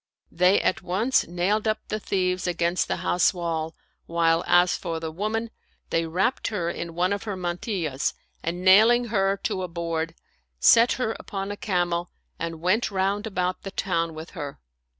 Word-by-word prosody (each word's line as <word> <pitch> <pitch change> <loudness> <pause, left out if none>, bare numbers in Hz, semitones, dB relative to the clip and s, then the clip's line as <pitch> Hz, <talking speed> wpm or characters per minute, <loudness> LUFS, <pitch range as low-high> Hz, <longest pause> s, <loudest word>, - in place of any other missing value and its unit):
They 180 +3 +4
at - - 0
once 200 +9 +1
nailed 190 +6 0
up 215 0 +2
the 215 - -2
thieves 185 -2 -1
against 175 0 0
the - - 0
house 180 +2 +3
wall, 165 -2 -3 0.3
while, 165 0 +2
as 175 0 +5
for 165 -3 -4
the 160 -1 -4
woman, 220 +6 -2 0.4
they 165 0 +1
wrapped 190 +10 0
her 175 -6 -1
in 170 -1 -6
one 180 +3 +2
of 200 - -3
her 205 -3 -3
mantillas 175 - -2 0.3
and 175 +2 -3
nailing 225 +5 +6
her 195 -1 +2
to 200 -4 -1
a 180 - -2
board, 165 -1 -3 0.4
set 230 - +6
her 235 -3 -1
upon 195 0 -5
a - - -4
camel 175 -3 -1 0.3
and 165 -1 -4
went 185 +7 +2
round 200 +2 0
about 185 -3 -1
the 195 - -6
town 165 -5 -1
with 160 +2 -8
her. 145 -1 -6
180 Hz, 170 wpm, -25 LUFS, 170-200 Hz, 0.4 s, nailing